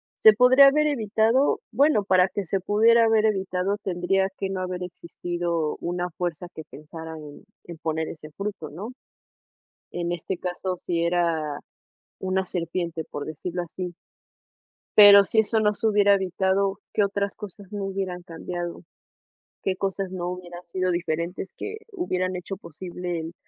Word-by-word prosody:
¿se 220 - +7
podría 255 +4 +7
haber 300 +2 +4
evitado?, 225 0 +2
bueno, 275 -2 +3
para 185 -2 +4
que 195 +2 -4
se 190 +2 -1
pudiera 225 +4 +4
haber 220 -1 +3
evitado, 190 -1 0
tendría 190 +1 +1
que 195 - -2
no 190 -1 -3
haber 180 0 -3
existido 170 -2 -3
una 175 +1 -2
fuerza 175 0 -3
que 160 - -8
pensara 160 +2 -9
en 150 +2 -11 0.2
en 170 -1 -9
poner 160 0 -2
ese 155 -1 -9
fruto, 195 -4 -5
¿no?, 195 +10 -7 1.0
en 175 0 -2
este 175 +2 -3
caso, 180 +1 -3
si 170 -1 -1
era 165 -4 0 0.6
una 190 0 0
serpiente, 170 -1 -3
por 145 - -5
decirlo 175 +3 -4
así. 175 +1 -6 1.0
¿Pero 200 -1 +10
si 220 - +3
eso 220 +1 +1
no 210 -1 +2
se 225 - 0
hubiera 205 -1 +5
evitado, 190 +1 0
que 210 - +2
otras 200 0 -1
cosas 205 -1 -10
no 205 -1 -3
hubieran 190 -2 -3
cambiado?, 175 0 -6 0.8
¿qué 190 - 0
cosas 195 -1 -2
no 175 -2 -3
hubieran 175 -1 -7
sido 185 +1 -1
diferentes 170 +2 -3
que 430 +1 -5 0.2
hubieran 185 - -1
hecho 185 +2 -5
posible 175 0 -6
en 165 +1 -6
185 Hz, 155 wpm, -25 LUFS, 175-200 Hz, 1.0 s, Pero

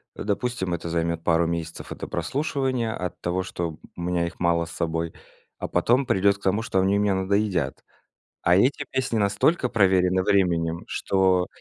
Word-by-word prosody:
допустим, 100 -3 -2
это 85 -1 -4
займёт 85 0 -1
пару 85 0 +3
месяцев 85 0 -4
это - - -6
прослушивания, 130 -6 -1
от 90 -1 -5
того, 90 +1 -1
что 85 -4 -4 0.2
у 85 - -7
меня 85 -1 0
их 85 - -7
мало 85 -1 +2
с - - -11
собой, 80 0 -2 0.4
а - - -4
потом 120 +9 +2
придёт 100 -4 +3
к - - -28
тому, 100 +3 +1
что 100 -4 0
они 95 +2 +3
мне 100 -1 +2
надоедят. 95 -2 0 0.6
А 85 +1 +4
эти 125 +8 +2
песни 130 -4 -1
настолько 105 - +2
проверены 95 -4 +3
временем, 85 -4 +1
что 95 -2 +2
95 Hz, 165 wpm, -25 LUFS, 85-105 Hz, 0.6 s, А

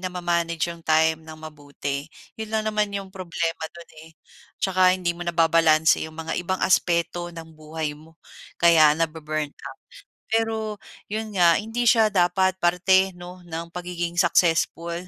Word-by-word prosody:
na 185 -1 -4
ma-manage 170 -2 -1
'yong 170 -1 -9
time 160 0 +2
ng 160 0 -11
mabuti, 145 -2 -6 0.3
'yon 220 0 -7
lang 220 -1 0
naman 210 -1 -1
'yong 195 -1 -5
problema 170 -3 -4
do'n, 170 0 -13
eh. 160 - -15 0.5
'Tsaka 185 -1 +3
hindi 175 -2 -2
mo 175 - -6
nababalanse 165 -2 +3
'yong 160 - -9
mga 160 0 -4
ibang 185 +1 -2
aspeto 175 -1 +1
ng 165 -1 -10
buhay 155 -1 -5
mo, 160 +2 -19 0.4
kaya 160 -3 +6
nabu-burn 155 -2 -2
out, - - -12 0.5
pero 225 0 +1 0.5
'yon 220 0 -3
nga 170 -2 +6
hindi 225 +3 -3
siya 225 -3 +5
dapat 185 0 +2
parte 190 +2 +3
'no 180 +1 -11
ng 165 0 -5
pagiging 175 -1 -4
successful 170 -1 +2
170 Hz, 150 wpm, -24 LUFS, 160-185 Hz, 0.5 s, kaya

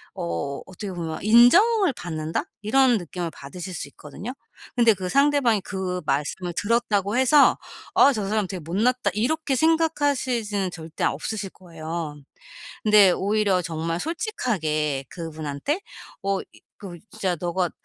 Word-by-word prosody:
어 85 +12 -3
어떻게 190 +2 -7
보면 165 -3 -5
'인정을 340 - +6
받는다.' 160 -5 -3 0.2
이런 250 +2 +4
느낌을 175 -1 -5
받으실 180 +6 -8
수 145 - -5
있거든요. 150 - -8 0.4
근데 235 -2 +5
그 185 -1 -4
상대방이 275 -4 +3
그 185 -2 -4
말씀을 150 +6 -1
들었다고 205 -2 +1
해서 270 +3 +5 0.4
'어 280 - +7
저 210 -5 -2
사람 210 -1 0
되게 185 0 -5
못났다.' 220 +11 0
이렇게 275 +6 0
생각하시지는 265 - +1
절대 160 -2 -7
없으실 195 +7 -3
거예요. 165 -3 -6 0.7
근데 210 -3 +7
오히려 200 -1 +1
정말 165 0 -3
솔직하게 160 - -1
그분한테 160 - -4 0.4
어 195 0 0
이 - - -15 0.2
그 180 -4 -8
"진짜 190 -5 -1
너가 175 0 -1
195 Hz, 305 characters per minute, -24 LUFS, 165-240 Hz, 0.7 s, 어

